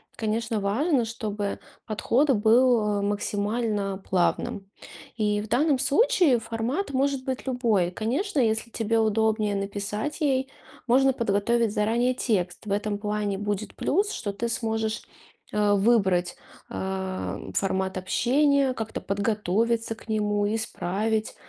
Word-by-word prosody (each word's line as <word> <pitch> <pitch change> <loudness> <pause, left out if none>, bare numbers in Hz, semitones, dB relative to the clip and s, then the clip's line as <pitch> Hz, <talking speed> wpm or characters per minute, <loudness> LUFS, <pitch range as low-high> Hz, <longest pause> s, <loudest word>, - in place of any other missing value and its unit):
конечно, 225 0 -1
важно, 240 - +1
чтобы 210 -3 -4 0.3
подход 240 +6 +1
был, 220 -2 +3
э, - - -2
максимально 205 0 -1
плавным. 190 +1 0 0.5
И 210 -2 0
в 215 - -7
данном 275 +4 +2
случае 315 - +3
формат 230 - -3
может 275 0 0
быть 260 -1 -3
любой. 230 -8 +1
Конечно, 275 - -1
если 225 -1 +1
тебе 225 0 0
удобнее 220 -1 +1
написать 205 +8 -3
ей, 265 -2 +1 0.4
можно 265 +2 +4
подготовить 230 0 +1
заранее 235 +4 +1
текст. 195 -7 -1
В 205 - -5
этом 205 +1 -1
плане 210 -1 -2
будет 205 0 -3
плюс, 405 +6 +1
что 205 - -4
ты 230 +4 -3
сможешь, 220 -1 -1 0.5
э, 210 -1 +2
выбрать, 195 -4 +2 0.3
э, 190 0 -3
формат 190 -1 -1
общения, 270 +8 +2
как-то 225 -2 -5
подготовиться 220 +3 0
к 225 - -17
нему, 210 -1 0
исправить, 220 0 -2
220 Hz, 125 wpm, -26 LUFS, 205-245 Hz, 0.5 s, можно